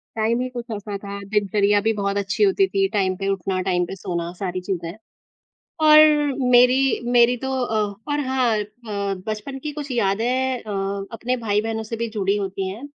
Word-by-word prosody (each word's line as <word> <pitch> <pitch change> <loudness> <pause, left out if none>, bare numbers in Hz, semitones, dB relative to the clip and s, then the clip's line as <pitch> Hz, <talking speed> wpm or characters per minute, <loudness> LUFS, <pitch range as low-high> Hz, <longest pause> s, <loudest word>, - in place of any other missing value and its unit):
Time 225 +2 +1
ही 255 - -1
कुछ 240 -1 -6
ऐसा 205 0 -5
था। 200 0 -7
दिनचर्या 205 0 +2
भी 220 +2 +2
बहुत 200 -1 -1
अच्छी 200 - 0
होती 390 -1 +3
थी, 195 - +1
टाइम 190 -3 +1
पे 195 - -3
उठना, 190 0 -2
टाइम 180 -1 +1
पे 190 - -7
सोना 170 -2 -4
सारी 185 -2 -3
चीज़ें। 175 -3 -4 0.9
और 305 0 +9 0.5
मेरी 250 +1 +6 0.4
मेरी 240 +1 +6
तो 265 +2 -4
अ 220 -2 -1 0.3
और 290 - 0
हाँ 255 -4 +2
अ, 210 - -2 0.6
बचपन 215 +6 -4
की 300 - -3
कुछ 290 -2 -6
यादें 245 +4 0
अ 195 -1 -3
अपने 250 +3 -2
भाई-बहनों 220 0 -1
से 220 +1 -5
भी 235 +1 -2
जुड़ी 200 -2 0
होती 195 -1 -3
हैं। 210 +7 -8
210 Hz, 180 wpm, -22 LUFS, 195-245 Hz, 0.9 s, और